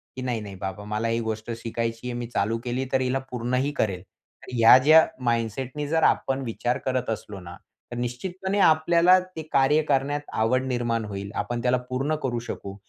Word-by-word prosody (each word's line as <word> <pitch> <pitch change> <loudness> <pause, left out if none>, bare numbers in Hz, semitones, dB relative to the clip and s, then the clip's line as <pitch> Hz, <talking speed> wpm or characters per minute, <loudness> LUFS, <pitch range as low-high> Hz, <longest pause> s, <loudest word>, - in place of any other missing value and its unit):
की 130 - -6
"नाही-नाही 110 -6 -4
बाबा 95 +2 -6
मला 105 +2 -2
ही 115 0 0
गोष्ट 110 0 -4
शिकायची 115 +1 -3
आहे. 125 - -3
मी 120 - -4
चालू 115 -1 -1
केली 125 +1 -2
तर 130 - +3
हिला 130 +1 0
पूर्ण 125 0 -3
ही 135 +3 +1
करेल." 95 -4 -2 0.5
ह्या 115 0 +7
ज्या 155 +5 +6 0.2
माइंडसेटनी 120 +5 -1
जर 160 +1 +1
आपण 135 0 +2
विचार 120 +1 -1
करत 130 -2 -1
असलो 105 -2 -5
ना, 85 -1 -10 0.4
तर 120 - -5
निश्चितपणे 185 +11 -3
आपल्याला 170 +2 +5 0.2
ते 160 - -4
कार्य 140 +3 +4
करण्यात 145 0 0
आवड 125 +4 +1
निर्माण 120 -3 -1
होईल. 100 -1 -6
आपण 120 -1 -2
त्याला 125 +1 +2
पूर्ण 135 +4 -1
करू 120 -3 -1
शकू. 100 -4 -7
125 Hz, 180 wpm, -25 LUFS, 115-135 Hz, 0.5 s, ह्या